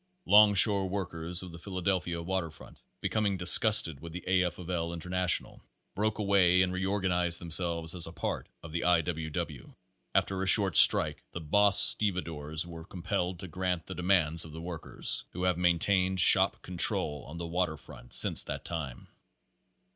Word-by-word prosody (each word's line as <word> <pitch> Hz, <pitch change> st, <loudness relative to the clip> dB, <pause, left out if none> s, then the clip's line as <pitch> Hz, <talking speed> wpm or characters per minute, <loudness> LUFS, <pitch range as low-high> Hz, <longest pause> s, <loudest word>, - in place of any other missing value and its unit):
Longshore 100 Hz, -2 st, +5 dB
workers 90 Hz, -2 st, -4 dB
of 90 Hz, -, -11 dB
the 85 Hz, -, -12 dB
Philadelphia 90 Hz, -2 st, -4 dB
waterfront, 85 Hz, -3 st, -7 dB, 0.2 s
becoming 105 Hz, -3 st, -2 dB
disgusted 90 Hz, -4 st, +5 dB
with 85 Hz, +1 st, -11 dB
the 90 Hz, -, -8 dB
A. 90 Hz, -1 st, +1 dB
F. 90 Hz, -, -5 dB
of 90 Hz, -, -11 dB
L. 85 Hz, -2 st, -4 dB
International, 90 Hz, +1 st, -2 dB, 0.3 s
broke 105 Hz, +1 st, -3 dB
away 95 Hz, -3 st, +2 dB
and 90 Hz, 0 st, -3 dB
reorganized 95 Hz, -2 st, -1 dB
themselves 85 Hz, -1 st, -1 dB
as 85 Hz, -2 st, 0 dB
a -, -, -9 dB
part -, -, -6 dB
of 85 Hz, -, -11 dB
the 85 Hz, +1 st, -4 dB
I. 90 Hz, -2 st, +2 dB
W. 80 Hz, -1 st, -6 dB
W. 75 Hz, -, -8 dB, 0.4 s
After 95 Hz, -1 st, -1 dB
a 95 Hz, -, -3 dB
short 95 Hz, -3 st, +6 dB
strike -, -, +5 dB
the -, -, -6 dB
boss 100 Hz, +5 st, +3 dB
stevedores 85 Hz, -9 st, 0 dB
were 85 Hz, -1 st, -11 dB
compelled 90 Hz, 0 st, -5 dB
to 95 Hz, -, -8 dB
grant 90 Hz, 0 st, -4 dB
the 95 Hz, -, -9 dB
demands 90 Hz, -3 st, 0 dB
of 80 Hz, -, -12 dB
the 80 Hz, -, -9 dB
workers, 85 Hz, -2 st, -4 dB
who 90 Hz, -, -6 dB
have 90 Hz, -1 st, 0 dB
maintained 90 Hz, +2 st, 0 dB
shop -, -, +3 dB
control 75 Hz, -5 st, -3 dB
on 75 Hz, +4 st, -10 dB
the 85 Hz, -, -6 dB
water 85 Hz, -1 st, -3 dB
front -, -, -6 dB
since -, -, +7 dB
that -, -, -7 dB
time. 75 Hz, -7 st, -7 dB
90 Hz, 170 wpm, -28 LUFS, 85-95 Hz, 0.4 s, since